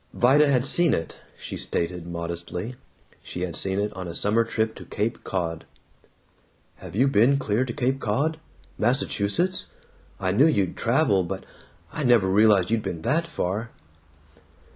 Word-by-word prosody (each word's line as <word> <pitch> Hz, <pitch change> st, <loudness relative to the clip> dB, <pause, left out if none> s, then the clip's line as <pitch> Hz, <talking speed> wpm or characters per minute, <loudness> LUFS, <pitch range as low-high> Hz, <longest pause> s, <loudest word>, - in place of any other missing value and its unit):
Vida 140 Hz, +5 st, +5 dB
had 130 Hz, -3 st, +2 dB
seen 170 Hz, +2 st, +3 dB
it, 80 Hz, -, -6 dB, 0.2 s
she -, -, -6 dB
stated 85 Hz, 0 st, -2 dB
modestly; 85 Hz, +6 st, -5 dB, 0.5 s
she 90 Hz, -, -7 dB
had 90 Hz, -3 st, -3 dB
seen 95 Hz, 0 st, 0 dB
it 105 Hz, +1 st, -2 dB
on 95 Hz, -2 st, -6 dB
a 85 Hz, -, -5 dB
summer 110 Hz, +3 st, +2 dB
trip 110 Hz, -1 st, -1 dB
to -, -, -11 dB
Cape 110 Hz, +3 st, -3 dB
Cod. 85 Hz, -4 st, -3 dB, 1.1 s
"Have -, -, -10 dB
you 130 Hz, +6 st, +3 dB
been 135 Hz, +2 st, +4 dB
clear 125 Hz, -2 st, 0 dB
to 125 Hz, -, -4 dB
Cape 130 Hz, +3 st, -1 dB
Cod? 145 Hz, +9 st, -1 dB, 0.4 s
Massachusetts? 130 Hz, -, +1 dB, 0.5 s
I 95 Hz, -1 st, 0 dB
knew 130 Hz, +11 st, +5 dB
you'd 100 Hz, -, +1 dB
traveled, 95 Hz, -3 st, +2 dB
but -, -, -5 dB, 0.5 s
I 150 Hz, -, -3 dB
never 115 Hz, -7 st, +4 dB
realized 105 Hz, -1 st, +4 dB
you'd 115 Hz, -1 st, +2 dB
been 80 Hz, -5 st, -5 dB
that 165 Hz, +3 st, +1 dB
far!" 110 Hz, -, -3 dB
110 Hz, 155 wpm, -25 LUFS, 95-130 Hz, 1.1 s, Vida